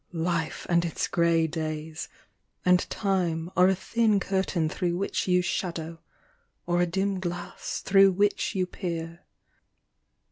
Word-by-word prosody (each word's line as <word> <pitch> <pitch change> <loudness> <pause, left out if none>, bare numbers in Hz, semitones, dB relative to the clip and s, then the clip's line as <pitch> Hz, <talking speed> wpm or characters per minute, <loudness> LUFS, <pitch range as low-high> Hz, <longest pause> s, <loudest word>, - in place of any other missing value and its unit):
Life 165 -1 -2
and 170 -1 +3
its 170 - -2
grey 170 -1 +2
days, 155 0 -4 0.6
and 180 0 +3
time 180 -4 -1
Are 180 0 +6
a 190 - +3
thin 215 +2 +1
curtain 190 -4 0
through 175 +2 -1
which 195 +1 -2
you 180 0 +3
shadow, 165 -2 -3 0.7
Or 175 0 +1
a 175 - +2
dim 195 +2 -1
glass 175 -1 -5
through 195 0 +5
which 205 +3 +1
you 185 -1 +1
peer. 170 -2 -5
175 Hz, 135 wpm, -27 LUFS, 165-190 Hz, 0.7 s, Are